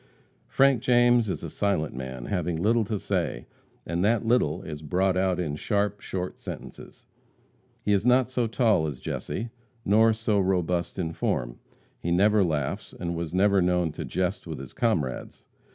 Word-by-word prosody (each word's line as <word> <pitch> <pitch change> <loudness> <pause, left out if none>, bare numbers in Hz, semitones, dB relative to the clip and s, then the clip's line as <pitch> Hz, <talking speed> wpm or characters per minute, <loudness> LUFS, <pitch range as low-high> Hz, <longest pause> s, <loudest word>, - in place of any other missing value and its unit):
Frank 135 -3 +3
James 120 -2 +4
is - - -3
a - - -4
silent 95 -9 -1
man, 65 -1 -6
having 90 -3 -1
little 110 +7 +2
to 105 +1 -2
say, - - -2 0.4
and 85 +2 -1
that 115 +2 +2
little 95 -8 +1
is 75 -2 -7
brought 90 +5 +1
out 95 -1 +1
in 75 -5 -2
sharp, 105 +4 -1
short 90 -1 -5
sentences. - - -9 0.8
He 105 - +2
is 100 -1 +2
not 125 +1 +4
so 125 -2 -1
tall 110 -8 +2
as 70 -4 -5
Jesse, 115 - -4 0.3
nor 110 +3 +5
so 110 -2 0
robust 90 -2 0
in 85 -3 -2
form. - - -2 0.4
He 85 - -3
never 100 +4 +4
laughs, 75 -6 -2
and 85 -1 -3
was 85 -2 -4
never 100 0 +4
known 90 -2 +1
to - - -6
jest 95 +3 -2
with 80 - -5
his 65 -1 -9
comrades. 80 - -1
95 Hz, 170 wpm, -26 LUFS, 80-110 Hz, 0.8 s, nor